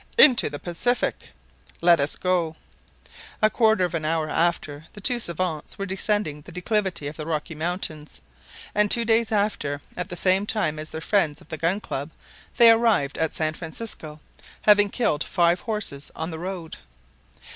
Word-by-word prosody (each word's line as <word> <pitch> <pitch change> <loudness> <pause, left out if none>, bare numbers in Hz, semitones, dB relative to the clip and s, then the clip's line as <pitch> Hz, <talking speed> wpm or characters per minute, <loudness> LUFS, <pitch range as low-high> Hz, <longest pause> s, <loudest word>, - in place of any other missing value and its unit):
"Into 260 - +7
the 145 - -5
Pacific!" 180 +11 -1 0.5
"Let 170 0 +5
us 140 +1 +1
go!" 175 -3 0 0.8
A 215 0 +3
quarter 220 -5 +3
of 175 - -5
an 165 -2 -2
hour 155 0 0
after 160 -3 -1
the - - -10
two 240 +5 +4
savants 170 -6 -3
were 195 - -3
descending 195 -5 -1
the - - -13
declivity 185 -2 -1
of 145 +1 -5
the 155 - -5
Rocky 160 +1 -3
Mountains; 155 -2 -3 0.5
and 210 0 +3
two 235 +2 +4
days 225 0 +2
after, 200 -9 0 0.2
at 180 -1 -4
the 180 - -5
same 190 +3 +2
time 155 -9 -1
as 155 +1 -3
their 160 - -6
friends 160 -5 +1
of - - -18
the 160 - -4
Gun 170 +5 +1
Club, 145 -7 -5 0.5
they 235 -2 +9
arrived 225 -12 +2
at 160 - 0
San 155 -1 0
Francisco, 160 -2 -7 0.4
having 205 -1 +6
killed 200 -10 0
five 175 -1 +2
horses 205 -11 -5
on 160 +2 -4
the 160 - -6
road. 175 -2 -6
175 Hz, 170 wpm, -24 LUFS, 155-210 Hz, 0.8 s, they